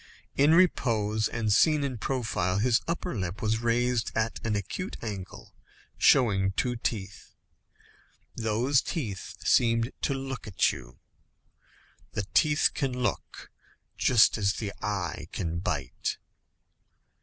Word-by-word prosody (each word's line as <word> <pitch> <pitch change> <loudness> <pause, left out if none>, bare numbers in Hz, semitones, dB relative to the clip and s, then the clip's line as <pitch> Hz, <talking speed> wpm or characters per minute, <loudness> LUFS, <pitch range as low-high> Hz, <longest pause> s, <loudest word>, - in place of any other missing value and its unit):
In 145 +4 +5
repose, 110 - +2
and 110 -3 0
seen 155 +5 +4
in 130 -5 -3
profile, 110 -8 -1
his 120 +3 +2
upper 175 0 -3
lip 95 -1 -4
was 110 +1 0
raised 120 0 0
at 115 0 -1
an 110 -2 0
acute 100 - -4
angle, 100 -4 -7 0.4
showing 100 -7 +4
two 125 +3 -1
teeth. 105 -4 -5 1.0
Those 120 +5 +1
teeth 105 - -5
seemed 115 +1 +3
to 140 - 0
look 135 -3 -6
at 100 - +2
you. - - -11 1.2
The - - -2
teeth 155 0 +4
can 135 -4 -2
look, - - -4 0.4
just 115 -2 +4
as 100 -1 +2
the 100 -3 -5
eye 95 -6 -3
can 85 -3 -3
bite. 70 -8 -3
115 Hz, 120 wpm, -28 LUFS, 100-130 Hz, 1.2 s, In